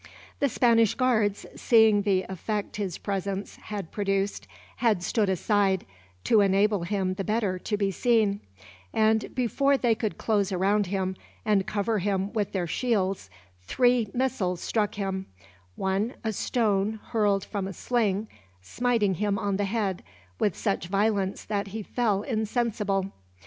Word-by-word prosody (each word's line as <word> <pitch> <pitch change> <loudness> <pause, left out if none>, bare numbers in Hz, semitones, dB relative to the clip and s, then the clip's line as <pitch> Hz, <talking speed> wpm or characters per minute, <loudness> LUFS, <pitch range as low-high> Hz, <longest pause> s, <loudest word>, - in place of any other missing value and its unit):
The 280 - +2
Spanish 230 -3 +3
guards, 220 -6 +1
seeing 220 -3 +5
the 195 -2 +1
effect 205 +4 -4
his 195 -5 -3
presence 195 0 -3
had 200 -5 -6
produced, 195 -1 -1 0.3
had 215 -7 +2
stood 210 +1 +1
aside, 190 0 +1 0.4
to 220 - +4
enable 200 0 +3
him 185 +1 -1
the 195 +1 -4
better 210 -3 0
to 210 +3 -2
be 200 -1 0
seen; 215 -2 +2 0.6
and 220 0 +2
before 270 +3 +2
they 240 -3 +2
could 220 -1 -3
close 205 -3 +1
around 195 +2 +2
him, 190 0 -1 0.3
and 205 -3 +2
cover 210 +1 0
him 195 +1 -1
with 210 -3 -1
their 185 -3 -1
shields, 195 - -1 0.3
three 245 - +2
missiles 220 -9 -1
struck 210 +1 -1
him; 195 -2 -3 0.5
one, 195 +5 -1
a 220 -1 -1
stone 215 -1 0
hurled 205 -4 +1
from 200 -2 -3
a - - -5
sling, 215 -2 0 0.3
smiting 210 - 0
him 200 +2 0
on 200 -3 -1
the 205 - 0
head 200 -3 -1 0.4
with 205 - +1
such 195 -5 -1
violence 200 0 0
that 205 -1 -2
he 215 +2 -5
fell 210 -3 0
insensible. 215 -4 -1
205 Hz, 145 wpm, -27 LUFS, 195-220 Hz, 0.6 s, seeing